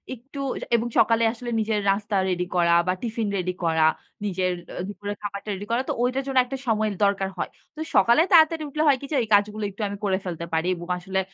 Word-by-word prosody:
একটু 270 +4 -11 0.2
অ্যা - - -7
এবং 235 +1 0
সকালে 230 0 +4
আসলে 240 0 -7
নিজের 215 -1 0
নাস্তা 205 +1 0
রেডি 180 -1 -1
করা 170 -1 +4
বা 185 - +3
টিফিন 230 -2 -2
রেডি 180 0 -2
করা, 160 -1 +2 0.4
নিজের 185 -2 0 0.3
অ - - -1
দুপুরে 205 0 -5
খাবারটা 205 0 -6
রেডি 200 +1 -6
করা। 235 +2 +2
তো - - +1
ওইটার 255 +2 0
জন্য 270 -1 -2
একটা 270 +2 -5
সময়ের 215 -2 +1
দরকার 195 -1 +2
হয়। - - -2 0.3
তো - - -11 0.2
সকালে 235 +6 +5
তাড়াতাড়ি 320 -2 +5
উঠলে 305 +2 -1
হয় 280 -2 +5
কি - - -6
যে - - 0
এই - - -5
কাজগুলো 210 +1 +2
একটু 200 +3 -10 0.2
করে 190 -2 +2
ফেলতে 170 -2 -4
পারি 160 +2 +1
এবং 175 0 -9
আসলে 190 +2 -2
205 Hz, 215 wpm, -24 LUFS, 185-235 Hz, 0.4 s, সকালে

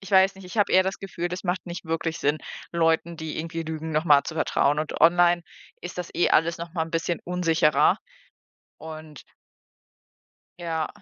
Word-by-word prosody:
ich 195 +1 -11
weiß 190 0 +5
nicht, 190 0 -13
ich 180 +5 -7
hab 205 - +4
eher 185 - +6
das 190 0 -3
Gefühl, 175 -3 -4
das 180 +2 -6
macht 180 0 -1
nicht 175 0 -6
wirklich 165 0 -2
Sinn, 150 0 +1 0.3
Leuten, 165 0 +1
die 160 -1 -5
irgendwie 165 +1 -4
lügen, 160 0 -5
noch 155 +2 +1
mal 145 -4 +6
zu 160 - -5
vertrauen, 150 -2 +1
und 155 - -3
online 175 +1 +5 0.4
ist 175 +1 -8
das 180 - -4
eh 175 - +3
alles 165 +2 +3
noch 170 0 -7
mal 160 - 0
'n 165 - -11
bisschen 165 +1 -1
unsicherer, 165 -4 +3 0.8
und 155 -2 -10 1.4
Ja. 165 -2 -2
165 Hz, 185 wpm, -25 LUFS, 160-175 Hz, 1.4 s, eher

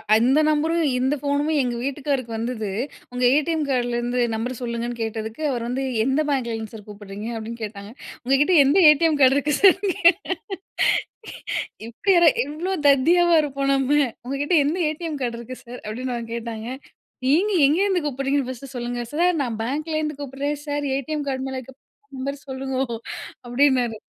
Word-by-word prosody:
அந்த 255 +7 +4
நம்பரும் 320 +2 +1
இந்த 265 +3 +1
ஃபோனும் 285 +2 0
எங்க 245 -2 -1
வீட்டுக்காருக்கு 275 -3 -2
வந்தது. 225 -2 -3 0.4
உங்க 250 0 -3
ஏடிஎம் 310 0 +1
கார்டுலேருந்து 245 -1 0 0.2
நம்பர் 245 +3 -4
சொல்லுங்கன்னு 235 0 -3
கேட்டதுக்கு, 220 +3 -4
அவரு 240 -2 -2
வந்து 260 +2 -2 0.2
எந்த 270 +3 +2
பேங்க்ல 255 -5 0
இருந்து 220 0 -7
சார் 210 -2 -10
கூப்பிட்றீங்க 205 +1 -8
அப்படின்னு 225 +1 -7
கேட்டாங்க. 205 -1 -7 0.3
உங்க 265 +2 +3
கிட்ட 360 +5 +3
எந்த 285 +7 +3
ATM 310 +1 +4
கார்டு 260 +1 +6
இருக்கு 290 +1 0
சார்னு 390 0 +5 0.2
கேட்ட. 345 +4 +5 1.6
இப்படி 310 - 0
யாரா 345 -1 +7 0.2
இவ்ளோ 320 +6 -4 0.2
தத்தியாவா 340 +6 +5
இருப்போம் 275 -1 -1
நம்ம, 270 0 0 0.3
"உங்க 265 +2 -3
கிட்ட 290 - -1
எந்த 320 +5 0
ஏடிஎம் 310 -1 -4
கார்டு 235 -2 -2
இருக்கு 255 +2 -8
சார்?" 245 +1 -9
அப்படீன்னு 245 +4 -4
அவங்க 230 -1 -6
கேட்டாங்க. 230 -1 -5 0.6
நீங்க 345 +11 +3
எங்கேருந்து 360 +4 +2
கூப்பிடுறீங்கன்னு 275 -1 -1
ஃபர்ஸ்ட்டு 260 +1 -8
சொல்லுங்க 240 0 -3
சார். 350 +4 +3
"நான் 235 -3 -3
பேங்க்லேருந்து 305 +3 -2
கூப்பிட்றேன் 285 +2 -3
சார், 290 0 -2
ஏடிஎம் 290 +2 -3
கார்டு 265 0 -2
மேல 265 0 -4
இருக்கிற 260 +1 -13 0.4
நம்பர் 280 +2 -4
சொல்லுங்கோ 265 0 -2 0.6
அப்படின்னாரு." 245 -3 +2
265 Hz, 155 wpm, -23 LUFS, 240-295 Hz, 1.6 s, யாரா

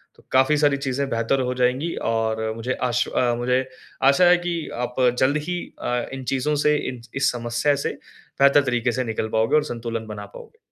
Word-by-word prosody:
तो - - -22
काफ़ी 135 +3 +4
सारी 145 -1 +3
चीज़े 140 0 -2
बेहतर 115 +3 0
हो 125 0 -1
जाएँगी 130 +6 0 0.2
और 110 -1 -1
मुझे 120 +3 -2 0.2
आश 120 0 +1
अ, 120 -1 +1
मुझे 125 +2 +1 0.4
आशा 140 +6 +5
है 175 0 +6
कि 170 -1 -1 0.2
आप 125 0 -4 0.2
जल्द 140 +3 +3
ही 180 0 -1 0.2
अ, 125 - -2 0.2
इन 135 -1 -6
चीज़ों 150 +3 0
से, 150 +1 +3
इन 125 -2 -8
इस 135 +1 +2
समस्या 120 +4 0
से - - +1 0.5
बेहतर 140 +1 +6
तरीके 120 -2 0
से 130 +2 -1
निकल 110 -2 -3
पाओगे 110 +6 +2
और 150 - +4
संतुलन 115 -1 -5
बना 105 -1 -7
पाओगे। - - -14
125 Hz, 195 wpm, -23 LUFS, 115-140 Hz, 0.5 s, है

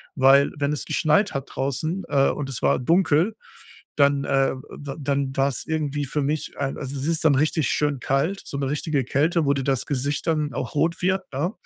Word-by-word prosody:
Weil, 135 +1 +5
wenn 145 +1 0
es 150 - -3
geschneit 200 +6 +2
hat 135 0 -4
draußen, 140 +7 -2
äh, 140 -2 +3
und 140 -2 -4
es 125 - -5
war - - +2
dunkel, 170 - +2 0.6
dann, 140 -1 +3
äh 135 0 +2 0.2
d 140 -2 -6
dann 140 -1 -1
war's 135 -2 0
irgendwie 150 -2 -1
für 145 +2 -2
mich 150 +2 -2
ein 135 -1 -2
also 140 0 -5
es 135 - -4
ist 165 -1 0
dann 145 - +5
richtig 155 +2 +1
schön 145 -2 0
kalt, 145 +11 0
so 140 - -6
'ne 140 -1 -2
richtige 150 -3 -1
Kälte, 155 +5 +1
wo 140 - +3
dir 135 - -2
das 135 -3 0
Gesicht 140 +2 -2
dann 150 -3 0
auch 125 - -4
rot 165 +4 0
wird, 190 +1 +1
ne? 160 +9 -1
145 Hz, 205 wpm, -24 LUFS, 135-155 Hz, 0.6 s, Weil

